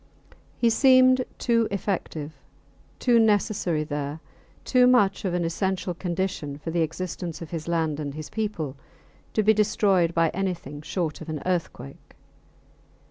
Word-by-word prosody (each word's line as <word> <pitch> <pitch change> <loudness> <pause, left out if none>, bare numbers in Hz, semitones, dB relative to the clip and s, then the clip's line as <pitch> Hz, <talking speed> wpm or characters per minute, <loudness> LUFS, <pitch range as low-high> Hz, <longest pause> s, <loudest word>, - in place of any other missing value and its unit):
He 235 -1 +3
seemed 255 +1 +5
too 230 -2 +2
effective, 180 -6 -3 0.7
too 240 -2 +3
necessary 205 -7 +2
there, 145 0 -4 0.5
too 250 -1 +5
much 205 -6 +3
of 180 -2 0
an 175 -1 0
essential 185 +2 -1
condition 175 -5 -3
for 165 +3 -6
the 170 0 +1
existence 170 0 -4
of 165 - -9
his 165 -2 -5
land 160 -3 0
and 145 -2 -4
his 155 -1 -6
people, 205 -11 -3 0.6
to 215 - +2
be 215 +1 +5
destroyed 200 -5 +2
by 165 -1 +3
anything 175 -7 -4
short 160 -1 -3
of 160 - -8
an 155 -1 -3
earthquake. 175 - -4
180 Hz, 140 wpm, -25 LUFS, 155-210 Hz, 0.7 s, seemed